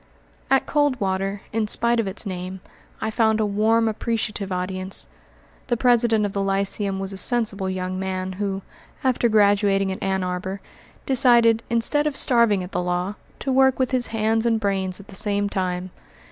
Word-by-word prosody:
At 270 0 +3
Coldwater, 200 -9 0
in 220 -1 0
spite 235 +2 +1
of 225 - 0
its 195 +4 -5
name, 185 0 -5 0.4
I 220 - -1
found 220 -1 +2
a 215 - +2
warm, 220 +3 +2
appreciative 215 -2 -2
audience. 185 +1 -3 0.6
The 240 -2 0
president 235 -3 +3
of 205 - -2
the 200 - -1
lyceum 195 0 0
was 195 0 -5
a - - -6
sensible 210 -4 +1
young 185 0 -3
man 190 0 -3
who, 195 -1 -2 0.4
after 250 -2 +2
graduating 200 -2 +3
at 190 - -6
Ann 190 -1 0
Arbor, 185 +2 -4 0.5
decided, 235 -3 +4
instead 245 +6 +2
of 295 - -2
starving 235 -8 +3
at 180 - -9
the - - -1
law, 180 +2 -1 0.3
to 270 - -1
work 265 0 +4
with 260 -2 0
his 255 -2 +1
hands 225 0 0
and 230 -1 +2
brains 195 -3 0
at 200 - -13
the 205 - -13
same 205 +1 0
time. 185 -2 -3
205 Hz, 175 wpm, -23 LUFS, 190-230 Hz, 0.6 s, decided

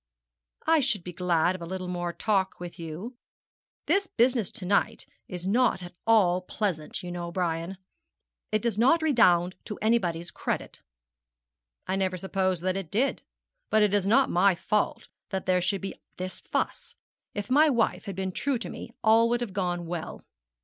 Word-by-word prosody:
'I 325 0 +5
should 245 -9 0
be 180 - -7
glad 175 -1 +2
of 185 - -8
a - - -4
little 185 0 -4
more 175 -1 -2
talk 195 0 0
with 175 0 -8
you. 170 +10 -7 0.7
This 395 0 +2
business 240 - +2
of - - -10
to 185 - -5
night 200 +2 +1 0.2
is 180 -1 -6
not 220 -3 +2
at 175 - -9
all 185 -5 +4
pleasant, 180 -5 -3
you 175 - -5
know, 175 -1 -4
Brian. 170 +1 -2 0.7
It 215 -1 +1
does 230 -3 0
not 295 +8 +4
redound 185 - +4
to 210 - -6
anybody's 175 -7 +1
credit.' - - -4 1.0
'I 190 - -1
never 185 -1 0
supposed 185 -1 -1
that 185 +1 0
it 190 -5 -5
did; 250 - +1 0.5
but 215 0 +4
it 205 -1 +2
is 200 -2 +2
not 260 +6 +4
my 185 +1 +4
fault 210 +4 -1 0.2
that 190 -1 -3
there 185 -1 +3
should 190 +2 0
be 195 - -4 0.2
this 185 0 -5
fuss. - - -3 0.4
If 205 +3 -4
my 300 +3 +6
wife 235 -5 +1
had 200 -3 -5
been 190 0 -2
true 275 +7 0
to 230 - -6
me - - -7
all 225 +1 +5
would 240 0 +1
have 225 -6 -4
gone 175 -3 -1
well.' 165 -1 -6
190 Hz, 180 wpm, -27 LUFS, 180-225 Hz, 1.0 s, my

